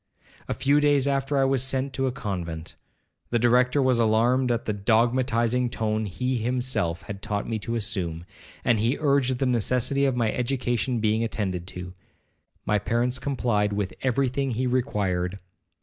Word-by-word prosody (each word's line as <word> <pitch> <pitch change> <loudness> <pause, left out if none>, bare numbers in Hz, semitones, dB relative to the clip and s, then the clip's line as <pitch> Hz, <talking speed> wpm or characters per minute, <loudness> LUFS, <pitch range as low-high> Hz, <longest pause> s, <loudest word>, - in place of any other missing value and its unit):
A - - -2
few 140 +3 +3
days 145 -2 +3
after 140 0 0
I 135 - +4
was 135 -1 +2
sent 130 +1 -1
to 135 0 0
a - - 0
convent. 90 -10 -5 0.6
The 120 - +1
Director 125 +4 +3
was 130 -2 +3
alarmed 120 +3 +3
at 120 -1 -1
the 110 - -1
dogmatizing 120 +3 +1
tone 110 -2 -1
he 125 +7 -2
himself 115 -7 -1
had 100 0 -7
taught 105 -2 -3
me 110 -1 -2
to 115 +3 -3
assume, 90 -7 -2 0.4
and 115 -3 +3
he 115 +6 +1
urged 140 -4 +2
the 135 - 0
necessity 125 +3 +1
of 135 -2 +1
my 115 -3 +1
education 120 -2 -1
being 110 +1 +1
attended 95 -6 -3
to. 90 -1 -7 0.7
My 105 0 +2
parents 120 +4 0
complied 120 -7 0
with 100 -2 -2
every 130 +1 +1
thing 135 +2 -1
he 125 +2 -1
required. 100 -8 -1
120 Hz, 165 wpm, -25 LUFS, 105-130 Hz, 0.7 s, I